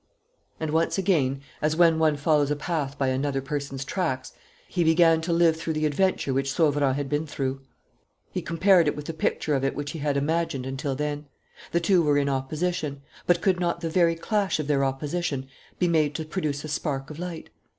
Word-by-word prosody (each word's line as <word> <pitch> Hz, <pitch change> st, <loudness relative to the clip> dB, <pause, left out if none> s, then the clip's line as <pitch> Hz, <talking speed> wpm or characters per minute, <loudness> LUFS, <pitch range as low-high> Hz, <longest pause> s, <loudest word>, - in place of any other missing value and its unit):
And, 160 Hz, -1 st, -2 dB
once 165 Hz, +4 st, +1 dB
again, 150 Hz, -9 st, +1 dB, 0.2 s
as 155 Hz, +1 st, +1 dB
when 165 Hz, -1 st, +5 dB
one 155 Hz, -2 st, +3 dB
follows 145 Hz, -1 st, +2 dB
a 150 Hz, -, +1 dB
path 145 Hz, -2 st, -3 dB
by 135 Hz, -1 st, +1 dB
another 135 Hz, +1 st, 0 dB
person's 135 Hz, -1 st, -4 dB
tracks, 150 Hz, -7 st, -2 dB, 0.3 s
he 175 Hz, -, 0 dB
began 165 Hz, 0 st, +5 dB
to 170 Hz, +2 st, -2 dB
live 165 Hz, -1 st, +4 dB
through 160 Hz, 0 st, -3 dB
the 155 Hz, 0 st, 0 dB
adventure 150 Hz, -2 st, +1 dB
which 135 Hz, +1 st, 0 dB
Sauverand 145 Hz, -3 st, +2 dB
had 145 Hz, 0 st, -2 dB
been 150 Hz, +3 st, -1 dB
through. 135 Hz, -2 st, -3 dB, 0.7 s
He -, -, -2 dB
compared 170 Hz, 0 st, +4 dB
it -, -, +1 dB
with 150 Hz, -, -7 dB
the 165 Hz, -, -4 dB
picture 155 Hz, -1 st, -1 dB
of 135 Hz, -1 st, +1 dB
it 135 Hz, -, 0 dB
which 145 Hz, 0 st, -4 dB
he 165 Hz, -, -6 dB
had 145 Hz, -1 st, 0 dB
imagined 145 Hz, -2 st, -1 dB
until 135 Hz, +1 st, -3 dB
then. 150 Hz, +1 st, -3 dB, 0.4 s
The 170 Hz, -, +2 dB
two 180 Hz, +1 st, +4 dB
were 145 Hz, -3 st, +3 dB
in 140 Hz, 0 st, +1 dB
opposition; 140 Hz, +1 st, -2 dB, 0.2 s
but 175 Hz, -1 st, +3 dB
could 185 Hz, -2 st, +2 dB
not 170 Hz, -1 st, -1 dB
the 165 Hz, -1 st, -2 dB
very 170 Hz, -1 st, +3 dB
clash 200 Hz, +1 st, 0 dB
of 155 Hz, -, -1 dB
their 140 Hz, -1 st, +2 dB
opposition 140 Hz, +1 st, -2 dB, 0.3 s
be 180 Hz, -, +2 dB
made 155 Hz, -3 st, +2 dB
to 160 Hz, -, -3 dB
produce 150 Hz, -4 st, -3 dB
a -, -, -5 dB
spark 140 Hz, -2 st, -3 dB
of 150 Hz, -, -9 dB
light? 175 Hz, -2 st, -6 dB
150 Hz, 205 wpm, -26 LUFS, 140-165 Hz, 0.7 s, when